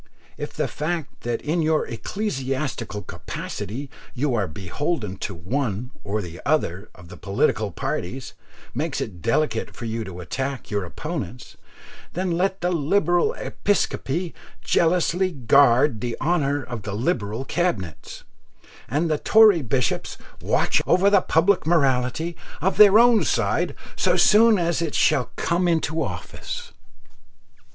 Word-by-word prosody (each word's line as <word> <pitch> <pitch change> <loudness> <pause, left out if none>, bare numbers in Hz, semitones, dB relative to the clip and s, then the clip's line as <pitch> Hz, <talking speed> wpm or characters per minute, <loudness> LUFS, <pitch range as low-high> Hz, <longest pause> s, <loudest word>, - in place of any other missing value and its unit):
If - - -6
the - - -1
fact 160 -1 -4
that 120 -1 -3
in 160 +3 0
your 155 0 +2
ecclesiastical 130 - -3
capacity 125 +8 -6 0.3
you 135 +1 0
are 105 -5 0
beholden 100 - -3
to 95 - -5
one 115 - -3
or 105 +1 -2 0.2
other 105 - 0
of 90 -2 -14
the - - -10
political 100 +1 0
parties 110 +7 -4 0.4
makes - - -2
it 90 - -5
delicate 115 - 0
for 120 - -7
you 115 0 -3
to 90 -2 -8
attack 130 - -4
your 100 -2 -1
opponents, 140 - -6 0.6
then 185 +1 -1
let 190 +3 0
the 180 +1 +1
Liberal 175 +2 +2
Episcopacy 175 -4 -1 0.3
jealously 180 +2 +2
guard 130 -1 +4
the 120 -1 -3
honour 145 -4 +1
of 120 -2 -6
the 100 0 -5
Liberal 115 - -1
Cabinets, 120 - -3 0.7
and 155 +5 +1
the 155 -2 0
Tory 215 -6 +6
bishops 125 0 -1 0.2
watch - - +2
over 195 +2 +4
the 200 -2 +5
public 175 +1 +2
morality 140 +1 +1 0.2
of 190 +6 0
their 210 0 +8
own 235 -1 +6
side - - 0 0.2
so - - +2
soon 220 +1 +6
as 170 -1 0
it 160 -3 -2
shall 125 - +2
come 175 +1 0
into 160 -1 0
office. 145 - -6
140 Hz, 135 wpm, -23 LUFS, 115-175 Hz, 0.7 s, their